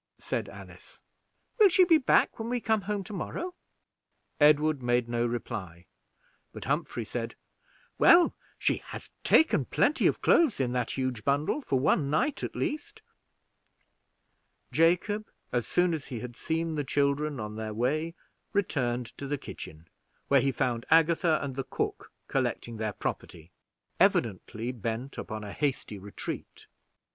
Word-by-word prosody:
said -, -, -3 dB
Alice. -, -, -13 dB, 0.6 s
"Will 415 Hz, -2 st, +8 dB
she 370 Hz, +1 st, +5 dB
be 335 Hz, -3 st, +5 dB
back 255 Hz, -, +3 dB
when 225 Hz, +1 st, -3 dB
we 245 Hz, 0 st, 0 dB
come 220 Hz, -2 st, +1 dB
home 200 Hz, +1 st, -2 dB
to 210 Hz, +3 st, -9 dB
morrow?" 350 Hz, -, -4 dB, 0.9 s
Edward 150 Hz, -1 st, +4 dB
made 120 Hz, -1 st, +1 dB
no 120 Hz, 0 st, 0 dB
reply, 95 Hz, -7 st, -5 dB, 0.7 s
but -, -, -8 dB
Humphrey 115 Hz, -, -1 dB
said, 115 Hz, +1 st, -4 dB, 0.6 s
"Well, 345 Hz, 0 st, +7 dB, 0.2 s
she -, -, +1 dB
has -, -, -8 dB
taken 180 Hz, -, +4 dB
plenty 295 Hz, -, +2 dB
of -, -, +1 dB
clothes 310 Hz, -, +4 dB
in 125 Hz, -2 st, +1 dB
that 125 Hz, 0 st, -2 dB
huge 130 Hz, -4 st, -2 dB
bundle 145 Hz, -, +1 dB
for 140 Hz, -, 0 dB
one 140 Hz, +1 st, +2 dB
night, 250 Hz, -, 0 dB
at -, -, -4 dB
least." 420 Hz, +9 st, -4 dB, 1.7 s
Jacob, 180 Hz, +6 st, +2 dB, 0.2 s
as 120 Hz, -1 st, -1 dB
soon 175 Hz, -1 st, +2 dB
as 155 Hz, -4 st, -4 dB
he 125 Hz, -5 st, -5 dB
had 120 Hz, -1 st, -7 dB
seen 165 Hz, +3 st, -2 dB
the 150 Hz, -1 st, -1 dB
children 140 Hz, +1 st, 0 dB
on 105 Hz, 0 st, -5 dB
their 110 Hz, 0 st, -4 dB
way, 150 Hz, +9 st, -1 dB, 0.4 s
returned 125 Hz, -, 0 dB
to 140 Hz, -, -5 dB
the 145 Hz, +1 st, -1 dB
kitchen, 80 Hz, -, -9 dB, 0.4 s
where 140 Hz, -2 st, +5 dB
he 135 Hz, -, +2 dB
found 120 Hz, -2 st, -1 dB
Agatha 165 Hz, 0 st, +4 dB
and 135 Hz, -2 st, -4 dB
the 135 Hz, -, -2 dB
cook -, -, -4 dB, 0.2 s
collecting 115 Hz, -1 st, -2 dB
their 110 Hz, -1 st, -2 dB
property, 85 Hz, -2 st, -5 dB, 0.5 s
evidently 115 Hz, +2 st, +1 dB
bent 115 Hz, +3 st, -4 dB
upon 110 Hz, -1 st, -5 dB
a 100 Hz, -1 st, -7 dB
hasty 135 Hz, -8 st, -2 dB
retreat. 100 Hz, +1 st, -7 dB
140 Hz, 150 wpm, -29 LUFS, 120-175 Hz, 1.7 s, Will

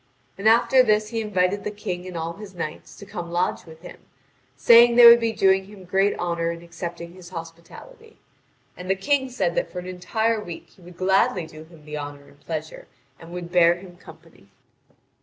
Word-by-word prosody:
And 205 Hz, +3 st, +2 dB
after 240 Hz, +3 st, +5 dB
this 215 Hz, -3 st, +1 dB
he 230 Hz, -1 st, -3 dB
invited 200 Hz, -2 st, 0 dB
the -, -, -3 dB
King 185 Hz, -3 st, -6 dB
and 180 Hz, -2 st, -7 dB
all 165 Hz, +1 st, -4 dB
his 195 Hz, 0 st, -12 dB
knights 160 Hz, -2 st, -7 dB
to 200 Hz, -, -12 dB
come 175 Hz, -3 st, -7 dB
to 170 Hz, -, -11 dB
lodge 175 Hz, 0 st, -2 dB
with 160 Hz, 0 st, -14 dB
him, -, -, -11 dB, 0.6 s
saying 235 Hz, 0 st, +6 dB
they 240 Hz, 0 st, +8 dB
would 235 Hz, 0 st, +10 dB
be 230 Hz, -1 st, 0 dB
doing 190 Hz, -2 st, +2 dB
him 200 Hz, -1 st, -14 dB
great 195 Hz, +3 st, +1 dB
honour 170 Hz, -1 st, -2 dB
in 170 Hz, 0 st, -6 dB
accepting 170 Hz, 0 st, -8 dB
his 180 Hz, -1 st, -13 dB
hospitality. 180 Hz, -, -12 dB, 0.6 s
And 180 Hz, +1 st, -9 dB
the 190 Hz, -, +2 dB
King 265 Hz, +6 st, 0 dB
said 190 Hz, -9 st, -1 dB
that 170 Hz, -, -2 dB
for 180 Hz, -, -10 dB
an 180 Hz, -, -5 dB
entire 215 Hz, +5 st, -2 dB
week 170 Hz, -4 st, -9 dB
he -, -, -24 dB
would 175 Hz, 0 st, -15 dB
gladly 185 Hz, -2 st, +1 dB
do 155 Hz, 0 st, -13 dB
him 160 Hz, -2 st, -18 dB
the 150 Hz, 0 st, -6 dB
honour 145 Hz, 0 st, -8 dB
and 140 Hz, -, -21 dB
pleasure, 155 Hz, +1 st, -7 dB, 0.3 s
and 165 Hz, -, -13 dB
would 175 Hz, 0 st, -7 dB
bear 175 Hz, -1 st, +5 dB
him 175 Hz, 0 st, -13 dB
company. 175 Hz, -, -17 dB
180 Hz, 205 wpm, -23 LUFS, 170-210 Hz, 0.6 s, would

